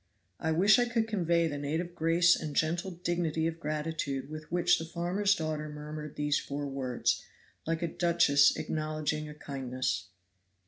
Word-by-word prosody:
I 160 - 0
wish 200 +9 +5
I 245 0 +2
could 230 -2 +1
convey 170 -5 +2
the 145 -3 -2
native 160 +5 -2
grace 170 +2 +4
and 150 -2 -5
gentle 170 +5 +1
dignity 170 -2 -1
of 165 0 -2
gratitude 150 -3 -3
with 155 0 -8
which 175 0 +3
the 165 - -4
farmer's 180 +5 +1
daughter 155 -2 -3
murmured 150 0 -7
these 145 0 +1
four 145 +1 -4
words, 135 -3 -1 0.4
like 165 +1 -1
a - - +1
duchess 165 -4 +4
acknowledging 155 -1 -2
a 150 - -9
kindness. 130 -4 -3
155 Hz, 155 wpm, -30 LUFS, 150-170 Hz, 0.4 s, wish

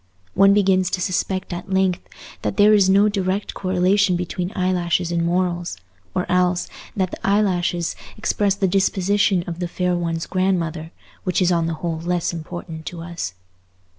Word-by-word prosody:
One 195 +1 +6
begins 190 -2 +3
to 185 - -2
suspect 185 +1 -1
at 175 +2 -6
length 190 -1 +2 0.4
that - - -3
there 210 +1 +6
is 200 -3 +5
no 200 +2 +5
direct 195 -1 -1
correlation 185 +1 +2
between 180 +1 -3
eyelashes 180 -2 0
and 170 -1 0
morals; 175 - -1 0.4
or 180 - 0
else, 180 -1 +1 0.3
that 185 -1 0
the - - -7
eyelashes 180 -4 +1 0.2
express 205 -2 +1
the 195 -1 +1
disposition 195 0 +2
of 170 0 -6
the 175 - -2
fair 180 +1 -1
one's 165 -1 -2
grandmother, 170 -4 -1 0.3
which 185 - 0
is 180 -1 +3
on 170 -2 +1
the 165 - -2
whole 165 -2 -2
less 175 +1 -1
important 165 -1 -7
to 175 -2 -6
us. 165 - -5
180 Hz, 165 wpm, -21 LUFS, 175-190 Hz, 0.4 s, One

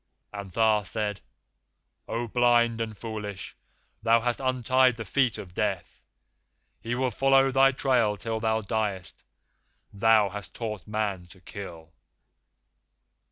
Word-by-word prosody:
And 100 -1 -6
Tha 110 +2 +3
said: 105 0 -3 0.9
'O 120 +1 -3
blind 120 -1 +3
and 110 -2 -4
foolish! 105 -3 -6 0.5
Thou 115 0 +4
hast 120 +1 -1
untied 130 -1 +2
the 115 -1 -6
feet 130 -5 +1
of 90 -2 -9
Death, 95 -3 -3 0.8
and 115 - -8
he 120 - +1
will 130 0 0
follow 135 +2 +3
thy 135 +1 +5
trail 125 -6 +1
till 110 +3 -3
thou 110 0 0
diest. 100 -4 -3 0.7
Thou 110 0 +4
hast 105 +1 -9
taught 110 -5 -5
Man 105 -4 -2
to 95 +2 -17
kill! 85 -4 -10
110 Hz, 130 wpm, -27 LUFS, 100-120 Hz, 0.9 s, thy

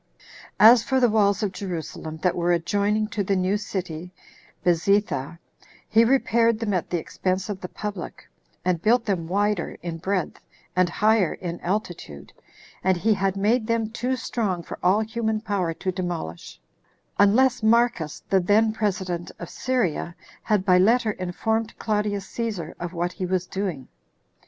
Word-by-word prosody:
2. - - -24 0.4
As 230 +2 +9
for 265 +2 +1
the 245 -3 +4
walls 205 -1 +2
of 200 - 0
Jerusalem, 165 -4 -6
that 180 - +2
were 175 0 +1
adjoining 205 +5 +1
to 210 -2 -2
the 195 +1 0
new 185 +2 +1
city 180 -5 -4 0.6
[Bezetha], 170 -4 +1 0.5
he 225 +1 +5
repaired 230 -2 +3
them 220 -3 -1
at 180 - -1
the 175 - 0
expense 185 +4 -2
of 200 -2 -4
the 180 - -5
public, 205 -4 -6 0.4
and 180 -3 +1
built 230 +3 +3
them 180 -6 -1
wider 200 0 0
in 165 -1 -4
breadth, 190 0 -2 0.4
and 180 -1 +3
higher 210 -1 +2
in 175 -2 -5
altitude; 175 - -4 0.5
and 185 -1 +3
he 215 +5 +2
had 195 -1 0
made 215 +3 +2
them 230 -1 0
too 250 +3 -1
strong 210 -8 -2
for - - -8
all 190 +4 +3
human 220 0 -1
power 200 -6 -1
to 185 - -2
demolish, 175 - -5 0.6
unless 245 +5 +4
Marcus, 225 -8 +2
the 195 - +5
then 215 +4 +3
president 185 -5 -2
of 170 - -8
Syria, 210 -9 -1 0.3
had 210 -4 +1
by 180 -1 +5
letter 225 +3 +3
informed 220 +5 -2
Claudius 210 -2 -1
Cæsar 205 -9 -4
of 175 0 -5
what 175 +1 -1
he 185 -2 -4
was 185 0 0
doing. 180 -9 -4
200 Hz, 160 wpm, -24 LUFS, 175-220 Hz, 0.6 s, As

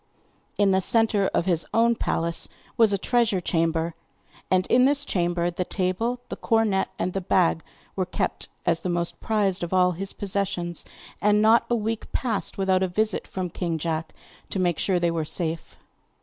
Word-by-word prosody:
In 205 -1 +4
the 190 0 +3
centre 215 -1 +2
of - - 0
his 170 -3 +1
own 230 +1 +4
palace 170 -6 -1 0.3
was 225 -3 +5
a 200 - +2
treasure 230 -2 +1
chamber, 165 -1 0 0.6
and 185 0 +3
in 250 +1 +4
this 285 +1 +2
chamber 175 -3 0
the 180 +1 -2
table, 195 +8 -1
the - - -4
cornet, 225 -4 +1
and 185 - -2
the 195 - -2
bag 80 - +2 0.3
were - - -1
kept - - -3 0.2
as 165 - +2
the 180 - -4
most 175 -1 -2
prized 205 -4 0
of 175 +1 -3
all 180 0 +4
his 195 +3 -3
possessions, 195 -4 -3 0.4
and 210 0 +4
not 220 +2 +5
a 240 - +2
week 225 0 -3
passed 225 -6 -2
without 190 -1 +2
a 190 - +2
visit 210 +3 -1
from 185 -2 -4
king 170 -2 -2
John 160 0 -2 0.4
to - - -3
make 175 -3 +1
sure 185 -3 +1
they 170 -1 +1
were 165 -1 -1
safe. 165 +1 -3
185 Hz, 180 wpm, -25 LUFS, 175-215 Hz, 0.6 s, was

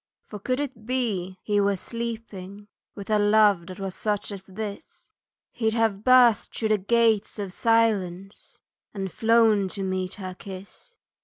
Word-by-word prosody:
"For 210 - -9
could 255 +6 -1
it 260 -6 -5
be 205 -8 -2
he 205 -1 +1
were 200 0 +2
sleeping. 210 -2 -6 0.3
With 200 +1 -7
a 210 - +4
love 205 -4 +4
that 185 -1 -8
was 195 -1 -4
such 210 0 -2
as 195 -2 -7
this 200 +1 -8 0.4
He'd 220 -2 -1
have 220 -3 +1
burst 250 -3 +5
through 220 - -1
the 215 -1 +3
gates 225 +1 +2
of 200 -3 -5
silence, 200 -5 0 0.4
And 195 -2 -4
flown 225 -3 +3
to 195 +1 -5
meet 185 0 -2
her 185 -2 -6
kiss." 195 - -11
205 Hz, 155 wpm, -25 LUFS, 195-225 Hz, 0.4 s, burst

